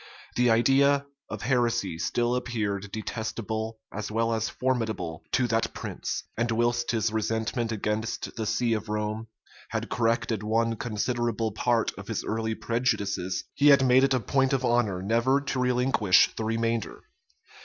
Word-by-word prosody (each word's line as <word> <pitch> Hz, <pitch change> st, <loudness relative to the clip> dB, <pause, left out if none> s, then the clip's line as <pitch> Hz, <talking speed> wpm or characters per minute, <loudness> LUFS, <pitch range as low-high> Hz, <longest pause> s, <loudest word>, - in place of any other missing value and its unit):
The 125 Hz, 0 st, +3 dB
idea 140 Hz, +5 st, +4 dB, 0.2 s
of -, -, -6 dB
heresy 120 Hz, -8 st, +1 dB
still 120 Hz, +5 st, 0 dB
appeared 105 Hz, -5 st, -2 dB
detestable 110 Hz, 0 st, -4 dB, 0.2 s
as 105 Hz, +1 st, -4 dB
well 115 Hz, +1 st, 0 dB
as 110 Hz, -1 st, -1 dB
formidable 110 Hz, -10 st, -2 dB
to 125 Hz, -, +3 dB
that 115 Hz, 0 st, 0 dB
prince; -, -, -4 dB
and 120 Hz, +1 st, 0 dB
whilst 120 Hz, +1 st, +1 dB
his 115 Hz, -2 st, +1 dB
resentment 110 Hz, +2 st, -1 dB
against 110 Hz, +1 st, -3 dB
the 110 Hz, -2 st, -3 dB
see 115 Hz, +2 st, +1 dB
of 110 Hz, 0 st, -3 dB
Rome 105 Hz, +1 st, -2 dB, 0.4 s
had -, -, -3 dB
corrected 115 Hz, -2 st, 0 dB
one 115 Hz, +2 st, +1 dB
considerable 115 Hz, 0 st, -1 dB
part 115 Hz, +2 st, +1 dB
of -, -, -9 dB
his -, -, -2 dB
early 110 Hz, 0 st, -2 dB
prejudices, 100 Hz, -7 st, -1 dB
he 145 Hz, -, +3 dB
had 140 Hz, -2 st, +7 dB
made 130 Hz, +1 st, +5 dB
it 135 Hz, -1 st, +3 dB
a -, -, +2 dB
point 135 Hz, +2 st, +1 dB
of 130 Hz, -1 st, +1 dB
honor 110 Hz, -7 st, +1 dB
never 115 Hz, +6 st, +2 dB
to 140 Hz, -2 st, -3 dB
relinquish 125 Hz, -6 st, +3 dB
the 110 Hz, -, -3 dB
remainder. 115 Hz, 0 st, -1 dB
115 Hz, 155 wpm, -27 LUFS, 110-120 Hz, 0.4 s, had